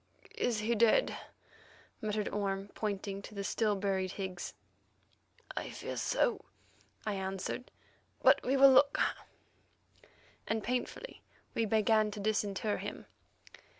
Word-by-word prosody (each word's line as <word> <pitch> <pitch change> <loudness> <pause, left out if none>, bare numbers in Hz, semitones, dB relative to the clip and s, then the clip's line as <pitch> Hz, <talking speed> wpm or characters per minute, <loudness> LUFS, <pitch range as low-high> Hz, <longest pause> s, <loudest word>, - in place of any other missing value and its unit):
"Is 230 -3 +1
he 225 +3 +1
dead?" 230 - +4 0.9
muttered 210 -1 -1
Orme, 195 -1 -2
pointing 200 -2 -3
to 210 - -11
the 200 - -3
still 210 +1 +1
buried 190 -2 -1
Higgs. 185 -3 -5 1.2
"Fear - - -5
so," 485 - +1 0.6
I 215 - 0
answered, 195 +6 -4 0.5
"but - - +7
we'll 270 +1 +6
look;" 280 +2 +5 1.5
and 220 -1 -1
painfully 250 - -3 0.3
we 230 - +1
began 215 0 +3
to 210 0 -7
disinter 210 0 0
him. - - -6
210 Hz, 110 wpm, -33 LUFS, 195-225 Hz, 1.5 s, but